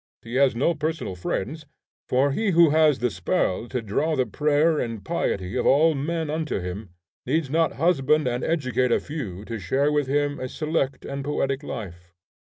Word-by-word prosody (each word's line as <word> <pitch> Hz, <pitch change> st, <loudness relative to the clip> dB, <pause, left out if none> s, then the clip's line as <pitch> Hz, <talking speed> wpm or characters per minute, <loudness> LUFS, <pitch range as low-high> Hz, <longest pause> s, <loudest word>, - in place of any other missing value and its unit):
He 115 Hz, -, -9 dB
has 135 Hz, -1 st, +3 dB
no 140 Hz, +8 st, +2 dB
personal 155 Hz, -, -3 dB
friends, 140 Hz, -, -4 dB, 0.4 s
for 135 Hz, +3 st, +3 dB
he 215 Hz, +9 st, 0 dB
who 170 Hz, -3 st, +7 dB
has 155 Hz, -2 st, +4 dB
the 125 Hz, -1 st, 0 dB
spell 90 Hz, +4 st, -1 dB
to 125 Hz, -1 st, -3 dB
draw 150 Hz, +10 st, 0 dB
the 130 Hz, -2 st, +1 dB
prayer 150 Hz, +3 st, +2 dB
and 115 Hz, -3 st, -4 dB
piety 100 Hz, -, -2 dB
of -, -, +1 dB
all 155 Hz, +4 st, +5 dB
men 160 Hz, +3 st, -2 dB
unto 155 Hz, -5 st, -2 dB
him 90 Hz, +3 st, -6 dB, 0.4 s
needs 145 Hz, 0 st, 0 dB
not 165 Hz, 0 st, +2 dB
husband 150 Hz, -2 st, +2 dB
and 120 Hz, 0 st, -1 dB
educate 130 Hz, -6 st, 0 dB
a -, -, +4 dB
few 110 Hz, -, -6 dB
to 115 Hz, 0 st, -5 dB
share 135 Hz, +11 st, +1 dB
with 145 Hz, -2 st, +1 dB
him 145 Hz, +1 st, 0 dB
a 130 Hz, -, -4 dB
select 150 Hz, -4 st, -2 dB
and 140 Hz, 0 st, -4 dB
poetic 135 Hz, -1 st, -1 dB
life. 90 Hz, -, -8 dB
140 Hz, 180 wpm, -24 LUFS, 115-155 Hz, 0.4 s, who